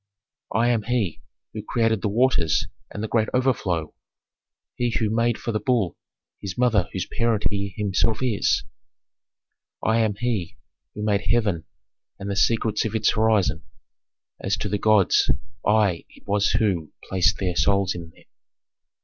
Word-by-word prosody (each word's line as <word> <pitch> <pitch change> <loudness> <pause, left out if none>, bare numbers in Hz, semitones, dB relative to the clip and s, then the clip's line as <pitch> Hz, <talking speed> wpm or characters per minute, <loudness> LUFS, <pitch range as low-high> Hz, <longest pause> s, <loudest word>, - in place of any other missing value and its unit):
Chorus 115 +3 +1
II. - - +3
"I - - +4
am 115 - 0
He 110 -6 -1 0.3
who 110 - -5
created 110 -1 0
the 105 - 0
waters 100 -9 +2 0.2
and 105 - -6
the - - -1
great 110 0 +1
overflow, 105 - 0 0.8
He 120 -1 -1
who 110 -2 0
made 115 +1 +1
for 115 - -4
the 110 - -1
bull 105 -5 0 0.4
his 100 +2 -6
mother 115 -8 +2
whose 90 -2 -3
parent 115 -3 0
he 100 -2 -3
himself 105 +2 +1
is." 115 -5 +1 1.2
Chorus 110 +1 +2
I. - - +4
"I - - +3
am 105 -2 -1
He 110 -6 -2 0.4
who 105 - -4
made 105 -2 +1
heaven 100 -9 +1 0.5
and 100 0 -5
the - - -2
secrets 110 +1 +2
of 110 0 -3
its 110 - +3
horizon; 110 -3 +2 0.8
as - - -1
to - - -3
the 105 - -1
gods 105 -3 +4 0.3
I 105 -5 +2
it - - -20
was 100 0 +2
who 90 -8 0 0.2
placed 95 -2 +2
their 90 -3 -2
souls 100 0 +2
in 85 -2 -8
them." - - -21
105 Hz, 165 wpm, -24 LUFS, 95-115 Hz, 1.2 s, I